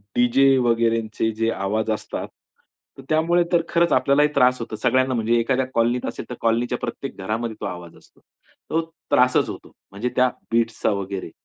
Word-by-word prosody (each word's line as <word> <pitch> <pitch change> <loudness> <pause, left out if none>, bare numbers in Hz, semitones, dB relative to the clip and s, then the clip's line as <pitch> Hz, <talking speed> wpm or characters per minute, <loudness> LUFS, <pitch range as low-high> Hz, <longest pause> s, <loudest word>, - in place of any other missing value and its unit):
DJ 135 +3 +4
वगैरेचे 115 -2 +1
जे 115 +1 -1
आवाज 110 +3 -1
असतात. 110 - -4 0.8
त्यामुळे 165 +3 +3
तर 175 -1 +4
खरंच 170 0 +2
आपल्यालाही 145 +2 +3
त्रास 125 -2 +4
होतो. 115 -2 -5
सगळ्यांना 130 +4 +1
म्हणजे 115 -1 +1
एखाद्या 130 +3 +1
कॉलनीत 120 +2 +1
असेल. - - -5
तर 125 - -5
कॉलनीच्या 120 +2 +1
प्रत्येक 135 - -5
घरामध्ये 110 +3 -3
तो - - -3
आवाज 90 -3 -7
असतो. - - -23 0.5
तो 165 - +1 0.3
त्रासच 125 0 +3
होतो. - - -9 0.2
म्हणजे 105 +6 -3
त्या 130 0 +4 0.2
बीट्सचा 115 -1 +1
वगैरे. 100 -2 -4
115 Hz, 155 wpm, -22 LUFS, 110-130 Hz, 0.8 s, DJ